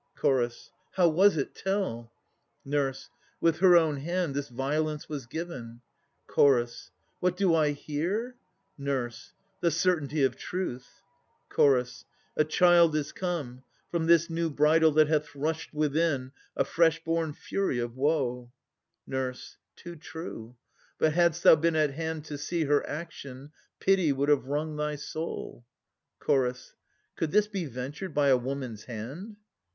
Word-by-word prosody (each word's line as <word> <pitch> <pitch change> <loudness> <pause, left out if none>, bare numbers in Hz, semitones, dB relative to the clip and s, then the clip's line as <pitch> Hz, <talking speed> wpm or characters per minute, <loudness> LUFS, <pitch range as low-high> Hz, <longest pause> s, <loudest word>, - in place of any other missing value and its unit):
CH. 120 -3 0 0.2
How 180 -2 +4
was 180 +3 +4
it? 140 - -2
Tell! 190 - -2 0.5
NUR. 140 -1 +1 0.5
With 165 -1 +2
her 180 -1 +7
own 160 -3 +2
hand 170 +1 -2
this 140 0 -3
violence 150 +4 -2
was 145 -6 -6
given. 125 -6 -7 0.5
CH. 120 -4 +2 0.3
What 180 0 0
do 190 -3 +3
I 155 -2 +3
hear? 175 - -3 0.4
NUR. 135 -4 -1 0.5
The 175 - +2
certainty 155 -3 +1
of 130 -2 +2
truth. 180 -9 -5 0.5
CH. 125 -3 +3 0.3
A - - +4
child 170 0 +5
is 150 0 -1
come, 150 -9 -4 0.3
From 165 -2 -1
this 170 0 +5
new 165 -1 -1
bridal 155 +2 +4
that 155 0 +5
hath 150 -1 -1
rushed 155 +3 -3
within, 150 -3 0 0.3
A - - +2
fresh 165 -1 +2
born 165 -1 0
Fury 195 -3 -2
of 120 0 -3
woe! 130 -4 0 0.5
NUR. 130 -1 -2 0.4
Too 175 0 -10
true. 150 -7 -8 0.4
But 155 - +2
hadst 170 0 +2
thou - - +9
been 165 +2 +1
at 155 -2 +2
hand 160 +1 -4
to 145 -2 -6
see 165 +3 -1
Her 145 -1 +2
action, 145 -3 -7 0.3
pity 190 -5 +3
would 140 +1 0
have 145 -4 +3
wrung 150 +2 -2
thy 150 0 -1
soul. 155 -4 -6 0.6
CH. 125 -2 0 0.4
Could 165 - -1
this 210 +5 +3
be 195 -5 -3
ventured 145 +7 -6
by 145 -1 +3
a 130 - +6
woman's 125 -4 -5
hand? 135 - -7
150 Hz, 145 wpm, -28 LUFS, 135-170 Hz, 0.6 s, thou